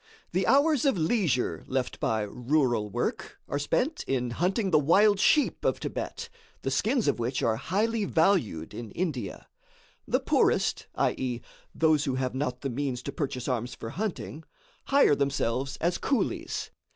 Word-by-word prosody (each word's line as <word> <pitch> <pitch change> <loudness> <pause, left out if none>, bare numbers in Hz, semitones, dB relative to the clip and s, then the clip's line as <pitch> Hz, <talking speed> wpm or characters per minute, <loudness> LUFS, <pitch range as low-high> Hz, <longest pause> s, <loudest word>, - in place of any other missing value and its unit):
The 185 +2 0
hours 280 +2 +4
of 270 -7 +3
leisure 160 - +1
left 130 -1 -2
by 110 -1 0
rural 120 -1 0
work - - -3
are 145 - -2
spent 260 - 0
in 125 -2 0
hunting 190 - 0
the 155 - +6
wild 195 +7 +4
sheep 295 +8 +3
of - - +1
Thibet, - - -5 0.4
the - - -1
skins 240 0 +1
of - - +1
which 120 +2 -1
are 110 -1 +2
highly 215 - 0
valued 160 - +1
in 120 -2 -7
India. 135 - -3 0.6
The - - +2
poorest, - - +1
i.e., 125 -2 0 0.4
those 155 -2 +3
who 135 -3 -1
have 130 -1 -1
not 130 -2 -2
the 135 - -2
means 130 -1 -3
to 140 - -4
purchase 135 -3 -3
arms 125 -2 -2
for 115 - -7
hunting, 180 -5 -4 0.4
hire 275 - +5
themselves 135 -1 -1
as 175 +1 0
coolies. 270 -4 -1
145 Hz, 155 wpm, -28 LUFS, 125-195 Hz, 0.6 s, the